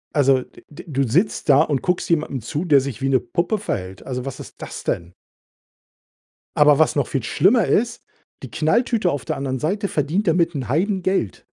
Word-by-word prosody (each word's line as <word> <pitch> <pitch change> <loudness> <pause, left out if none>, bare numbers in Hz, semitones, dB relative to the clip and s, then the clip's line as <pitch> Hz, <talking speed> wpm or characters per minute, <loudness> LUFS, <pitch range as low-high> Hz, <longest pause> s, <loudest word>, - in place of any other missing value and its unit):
Also, 135 -3 +4
d - - -19
d 150 - -15
du 140 -2 0
sitzt 175 - 0
da 140 +1 +7
und 140 -4 -1
guckst 180 -1 -1
jemandem 150 -5 0
zu, 145 - -4
der 145 -5 +5
sich 135 -4 -6
wie 135 - 0
'ne 130 -2 +3
Puppe 170 - -1
verhält. 95 - -5
Also, 125 -1 -4
was 135 - -6
ist - - -12
das - - -7
denn? 85 +1 -3 1.4
Aber 150 -1 +5
was 155 - +3
noch 140 -4 +1
viel 135 -5 -2
schlimmer 215 - +3
ist, 235 +2 0 0.4
die 130 - -8
Knalltüte 215 - +1
auf 140 - -4
der - - -3
anderen 130 -2 -3
Seite 200 +6 -1
verdient 160 +8 -1
damit 170 +1 +2
'n 130 -6 -5
Heidengeld. 185 - -1
150 Hz, 190 wpm, -21 LUFS, 135-180 Hz, 1.4 s, da